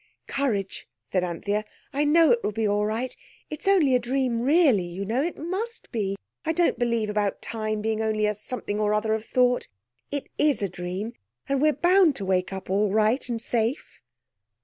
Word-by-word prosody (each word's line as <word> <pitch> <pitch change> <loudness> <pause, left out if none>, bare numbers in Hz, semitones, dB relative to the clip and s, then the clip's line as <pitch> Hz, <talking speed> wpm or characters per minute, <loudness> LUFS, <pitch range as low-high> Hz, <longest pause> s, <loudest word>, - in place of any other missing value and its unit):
"Courage!" 215 -9 -2 0.2
said 185 -2 0
Anthea. 200 +4 -2 0.3
"I 290 +2 +1
know 320 -1 +5
it 235 - +4
will 210 - 0
be 220 +1 0
all 205 +1 +1
right. 230 +4 -2 0.4
It's 305 +5 -5
only 350 -9 +4
a 250 - +5
dream 245 -1 0
really, 280 - +4
you 175 +3 -5
know. 230 +6 0
It 335 +4 -2
must 395 +8 -4
be! 200 -4 -1 0.3
I 320 - 0
don't 345 0 +2
believe 235 -3 +1
about 210 -1 -1
time 215 -1 -2
being 220 0 0
only 215 -1 +1
a 210 - +1
something 210 0 -2
or 210 0 +2
other 215 +1 +1
of 220 -1 -2
thought. 250 +1 +2 0.4
It 285 -1 -4
is 290 -8 +3
a 200 - 0
dream, 180 +6 -5 0.3
and 275 -1 0
we're 305 +1 +5
bound 350 -3 +4
to 195 - -4
wake 185 0 0
up 190 -1 -6
all 200 +2 +1
right 220 +5 +2
and 235 -1 -2
safe." 230 +3 -2
225 Hz, 195 wpm, -25 LUFS, 210-275 Hz, 0.4 s, know